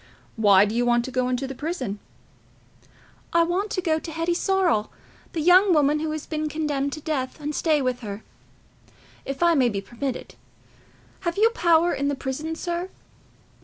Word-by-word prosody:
Why 205 -3 +5
do 210 - -3
you 240 +1 +1
want 240 0 +2
to 260 - -6
go 255 0 0
into 255 +1 -1
the 270 - -5
prison?" 260 - -4 1.3
"I 335 0 +5
want 365 +5 -1
to 370 - -2
go 320 -3 +1
to 325 - -8
Hetty 330 +2 -1
Sorrel, 355 - +1 0.4
the 325 - -2
young 360 +3 +6
woman 295 0 +3
who 315 0 -2
has 310 -1 -4
been 310 -1 -3
condemned 290 -2 -1
to 310 - -6
death—and 295 0 -3
to - - -2
stay 305 -4 +2
with 255 -1 -1
her, 210 -2 -7 1.0
if 275 +4 -3
I 340 0 +5
may 260 -6 +3
be 200 -3 -2
permitted. 240 +6 -5 0.9
Have 340 +1 -3
you 450 +2 +4
power 340 -5 +3
in 280 - -1
the 285 - 0
prison, 290 +5 -4
sir?" 345 +2 -3
300 Hz, 180 wpm, -24 LUFS, 255-340 Hz, 1.3 s, young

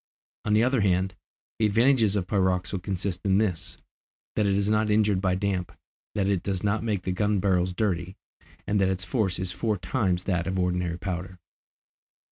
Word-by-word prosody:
On 105 - +1
the 110 - +4
other 130 -1 +2
hand, 95 -1 +1 0.5
the 110 - +4
advantages 115 -1 +3
of 95 -3 0
pyroxyle 95 -1 0
consist 95 -1 -3
in 95 -1 +3
this, 100 -6 -1 0.6
that 105 - +2
it 100 - +2
is 100 0 +1
not 110 0 +2
injured 105 -2 +3
by 95 -2 +1
damp, 95 -2 -1 0.4
that 100 -2 +1
it 100 -3 +1
does 95 -2 -3
not 105 +2 +1
make 105 -5 -1
the 95 - -1
gun 105 +2 +1
barrels 90 -1 +2
dirty, 90 -2 -1 0.5
and 100 -1 +1
that 95 - +3
its 95 -1 -1
force 95 -3 0
is 90 0 -2
four 110 +3 -1
times 90 -1 0
that 90 -3 -1
of 95 0 -1
ordinary 90 -1 0
powder. 90 0 -5
95 Hz, 185 wpm, -26 LUFS, 90-105 Hz, 0.6 s, the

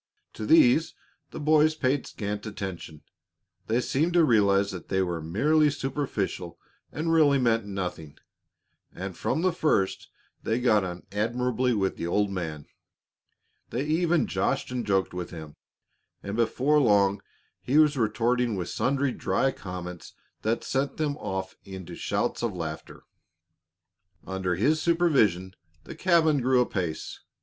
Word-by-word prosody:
To - - -6
these 250 - +5 0.3
the - - -8
boys 155 +1 +4
paid 135 -2 0
scant 105 0 -5
attention. 95 -7 -7 0.6
They 115 +2 +2
seemed 160 +8 0
to 175 -1 +5
realize 100 -5 +3
that 90 -3 -8
they 95 0 +1
were 85 -3 -3
merely 150 - +2
superficial 130 - -3 0.3
and 165 +3 -1
really 150 -4 +5
meant 115 -4 +1
nothing, 90 -6 -5 0.7
and 95 0 -6
from 160 - -1
the 185 -2 +2
first 150 - 0 0.3
they 115 +2 -1
got 110 -5 +3
on 90 -1 -6
admirably 120 +3 0
with 95 -2 -1
the 85 - -3
old 100 +3 +1
man. 80 -6 -5 1.0
They 130 +4 -2
even 165 +2 +2
joshed 135 - -1
and 120 -3 -3
joked 95 -2 +1
with 90 -1 -5
him, 80 -3 -9 0.7
and 100 +1 -4
before 130 +6 +2
long 100 -5 +3 0.4
he 135 +4 +1
was 155 -1 +5
retorting 120 0 +1
with 90 -2 -4
sundry 140 0 0
dry 135 +2 0
comments 90 -4 -8 0.3
that 115 +2 -1
sent 135 +1 -2
them 150 -2 -1
off 95 -4 -4
into 95 -3 -9
shouts - - -2
of 115 -5 -2
laughter. 80 -3 -7 1.2
Under 95 -1 -2
his 150 - +2
supervision 130 - +2 0.3
the - - -9
cabin 160 -6 +3
grew 130 +1 +3
apace. 90 -9 -2
115 Hz, 140 wpm, -27 LUFS, 95-145 Hz, 1.2 s, these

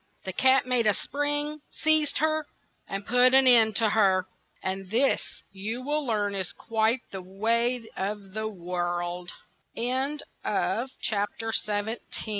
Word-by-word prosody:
The 190 - -4
cat 260 +3 +4
made 250 -3 +2
a 210 - +4
spring, 290 +3 -2
seized 310 -1 +2
her, 310 0 +1 0.4
and 195 +1 -4
put 250 +2 +5
an 265 0 +6
end 225 -4 +6
to 225 0 +3
her. 190 -3 +3 0.4
And 190 0 -3
this 245 +6 +3 0.3
you 215 +6 -4
will 295 +2 0
learn 210 -5 0
is 190 -3 -3
quite 225 +2 0
the 190 - -5
way 230 +5 0
of 195 0 -4
the 215 +1 -2
worl 175 -2 -3
220 Hz, 120 wpm, -27 LUFS, 195-260 Hz, 0.4 s, an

